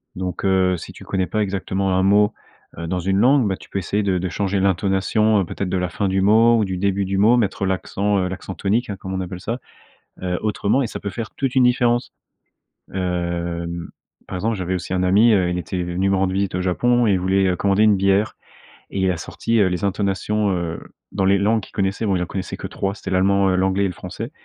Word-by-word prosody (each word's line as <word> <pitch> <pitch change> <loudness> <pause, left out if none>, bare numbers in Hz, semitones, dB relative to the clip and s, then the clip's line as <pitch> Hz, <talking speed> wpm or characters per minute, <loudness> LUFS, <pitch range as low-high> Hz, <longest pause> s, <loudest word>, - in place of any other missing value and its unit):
donc 90 0 -4
heu, 95 -1 +3
si 85 - -8
tu - - -13
connais 95 -2 -1
pas 110 -1 0
exactement 95 -1 -1
un 95 - +3
mot, 105 +2 +4 0.5
heu, 85 - -4
dans 90 +2 -1
une 95 +2 0
langue, 130 +1 +4
bah, 95 -1 -1
tu - - -15
peux - - -4
essayer 100 +2 -1
de 95 -2 +1
de 90 +1 -2
changer 100 +2 -1
l'intonation, 100 +3 +2
heu, - - -2
peut-être 95 +3 -4
de 95 - 0
la 90 -1 -1
fin 100 +3 -2
du 95 0 +1
mot 115 +4 +5
ou 110 - +2
du 95 -1 -3
début 100 +1 0
du 95 +1 -1
mot, 115 +5 +5
mettre 100 -4 0
l'accent, 100 +2 0
heu, - - -1
l'accent 95 0 -6
tonique, 105 +7 0
hein, 100 - -3
comme 95 0 -6
on 95 - -2
appelle 90 0 -6
ça, 115 +6 -4 0.6
heu, 90 -1 -1
autrement, 105 +3 +1
et 130 - 0
ça - - -7
peut 100 - -4
faire 115 +2 -5
toute 135 -2 -2
une 130 -2 +5
différence. 120 -1 +2 0.8
Hem, 85 -2 -3 0.4
par 95 - -5
exemple, 110 +4 -1
j'avais 95 -1 -2
aussi 90 0 -4
un 90 -1 +1
ami, 105 +6 +5
heu, 95 -4 +3
il 90 - -2
était 90 +1 -3
venu 90 +2 -1
me - - +3
rendre 95 0 +1
visite 100 -1 -1
au 90 - 0
Japon 120 +7 +2
et 105 - +3
il 95 - +2
voulait, 95 +1 +2
heu, 90 - 0
commander 100 +2 +2
une 105 -2 +5
bière 100 +2 +1 0.5
et 100 - -4
il 95 -1 +2
a 90 - -3
sorti, 115 +7 -1
heu, 100 - +4
les 90 +1 -2
intonations, 100 +1 0
heu, 85 -3 -2 0.3
dans 95 -1 0
les 100 +1 +4
langues 105 +3 +2
qu'il - - -13
connaissait. 100 +2 -1
Bon, 100 - +2
il 90 - 0
en - - -3
connaissait 95 +2 -5
que - - -8
3 95 0 -3
c'était 95 - -7
l'allemand, 95 +1 +3
heu, - - +1
l'anglais 95 +1 +1
et - - +2
le 90 - -4
français, - - -7
95 Hz, 250 wpm, -21 LUFS, 90-105 Hz, 0.8 s, mot